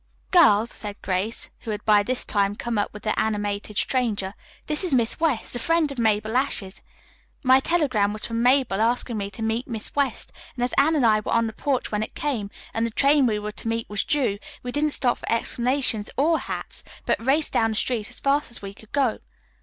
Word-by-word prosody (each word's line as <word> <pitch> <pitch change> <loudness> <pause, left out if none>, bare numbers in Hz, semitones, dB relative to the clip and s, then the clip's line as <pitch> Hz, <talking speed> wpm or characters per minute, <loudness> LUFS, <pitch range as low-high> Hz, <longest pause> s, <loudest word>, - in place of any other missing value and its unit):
"Girls," 235 - +5
said 205 -1 -4
Grace, 195 +4 -2
who - - -9
had 210 -1 -4
by 210 -1 +5
this 250 +5 0
time 200 -1 +1
come 230 0 -2
up 205 - -1
with 210 0 -11
the 215 - 0
animated 205 -1 -2
stranger, 210 -6 0 0.3
"this 300 +3 -1
is 345 -7 +1
Miss 235 -2 +1
West, 300 -8 0
a - - -2
friend 330 +3 +1
of 270 - -6
Mabel 220 0 +1
Ashe's. 230 -7 -1 0.6
My 260 0 +6
telegram 270 -10 +1
was 210 0 -2
from 230 0 -2
Mabel 250 -5 +3
asking 235 0 +1
me 200 0 -3
to 205 +3 -7
meet 225 +2 -1
Miss 225 -3 -4
West, 280 -2 0 0.2
and 245 - -2
as 245 - -1
Anne 315 +4 +4
and 275 -5 +3
I 215 -1 +5
were 215 - -5
on 230 0 +3
the 220 - -4
porch 265 +3 -1
when 210 0 0
it 220 - -5
came, 240 -9 -2 0.2
and 225 - 0
the 230 - +1
train 275 +3 +3
we 215 -2 +1
were 210 0 -4
to 220 - -7
meet 230 0 -1
was 210 - 0
due, 255 -9 0 0.2
we 245 - -4
didn't 295 +2 0
stop 245 -3 +2
for - - -5
explanations 235 -1 +1
or 315 +4 +3
hats, - - -5 0.2
but - - 0
raced 285 +5 +2
down 225 - +3
the 220 - -3
street 220 -1 -1
as - - -4
fast 280 +2 +1
as 235 - -4
we 200 0 -8
could 220 +2 -18
go." 270 -6 +1
230 Hz, 225 wpm, -24 LUFS, 210-270 Hz, 0.6 s, My